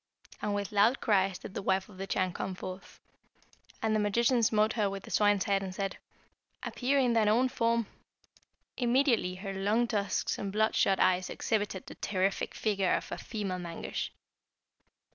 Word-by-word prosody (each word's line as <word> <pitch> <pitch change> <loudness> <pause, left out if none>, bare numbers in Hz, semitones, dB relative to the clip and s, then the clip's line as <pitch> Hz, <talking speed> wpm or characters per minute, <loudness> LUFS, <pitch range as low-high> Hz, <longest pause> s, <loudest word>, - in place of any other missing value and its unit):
And 205 -1 -1
with 200 +1 -3
loud 210 +5 +4
cries 195 -4 +2
did 190 - -10
the - - -3
wife 190 0 +1
of 190 -3 -15
the 195 - -4
Chan 185 -2 0
come 185 +1 -4
forth, 185 +1 -8 0.8
and 220 -1 +2
the - - +2
magician 235 +4 +2
smote 215 -1 +3
her 210 -3 +1
with 195 0 -6
the - - -11
swine's 205 -2 +3
head, 200 -1 +1
and 190 -1 -5
said, 195 0 -3 0.6
'Appear 270 +3 0
in 250 -3 +3
thine 225 -2 +3
own 245 +4 +3
form!' 230 -3 +1 0.9
Immediately 240 -6 +2
her 195 +1 -5
long 205 +5 +1
tusks 205 -3 -1
and 200 - -3
bloodshot 210 -2 +2
eyes 185 0 +3
exhibited 205 -4 -2
the - - -9
terrific 195 0 -1
figure 195 -4 +1
of - - -4
a - - -3
female 200 -5 -4
Mangusch. 170 -1 -4
205 Hz, 170 wpm, -30 LUFS, 190-225 Hz, 0.9 s, loud